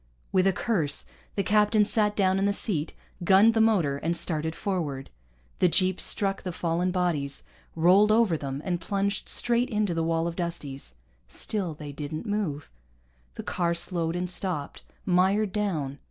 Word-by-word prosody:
With 185 0 +3
a - - +5
curse 180 -6 -1 0.3
the 200 - 0
captain 210 +1 +3
sat 210 -1 +1
down 190 -1 +2
in 195 - +1
the 200 - +2
seat, 170 -7 0 0.3
gunned 195 +6 +6
the 225 - +3
motor, 180 -11 +2
and 165 +4 -1
started 160 -1 -1
forward. 155 -9 -3 0.5
The 180 - +5
jeep 185 +2 +1
struck 195 -1 0
the 185 - -4
fallen 170 +1 -1
bodies, 170 -7 -1 0.3
rolled 185 +6 +5
over 220 -6 +4
them, 140 -1 -5
and 175 -2 -1
plunged 200 +2 -2
straight 240 +1 +1
into 210 -5 0
the 165 - -1
wall 165 0 0
of 170 -1 -3
Dusties. 150 - -5 0.3
Still 175 - -4
they 150 -1 -8
didn't 150 +4 -6
move. 200 -9 -3 0.6
The - - -6
car 170 -2 -1
slowed 170 -1 -1
and 180 +1 -2
stopped, 175 -5 -3 0.2
mired 190 +3 +2
down. 160 -10 -2
180 Hz, 165 wpm, -27 LUFS, 160-200 Hz, 0.6 s, gunned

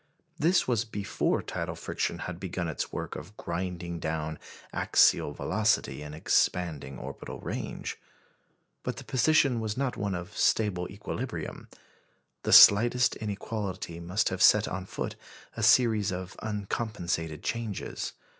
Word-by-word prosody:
This 175 +5 +3
was 120 -3 +2
before 105 -3 -1
tidal - - -4
friction - - -2
had 90 -1 -6
begun 90 -2 -3
its 80 - -3
work - - -5
of 105 +4 -9
grinding 85 -1 -4
down 80 -1 -3 0.3
axial - - +4
velocity 105 - 0
and 75 0 -7
expanding 80 -3 0
orbital 70 +2 -7
range. - - -5 0.8
But - - -3
the - - -7
position 135 -1 +3
was 110 0 -3
not 135 -2 -1
one 100 -3 -1
of 90 +4 -7
stable 95 -5 +1
equilibrium. - - -5 0.7
The - - -2
slightest 120 +5 +8
inequality 100 -4 -4
must 90 +5 0
have 95 0 -4
set 105 0 +6
on 95 0 -4
foot - - -4 0.4
a 115 - -4
series 110 -3 +4
of 90 0 -5
uncompensated 100 -6 -3
changes. 115 -4 -3
100 Hz, 130 wpm, -29 LUFS, 85-110 Hz, 0.8 s, slightest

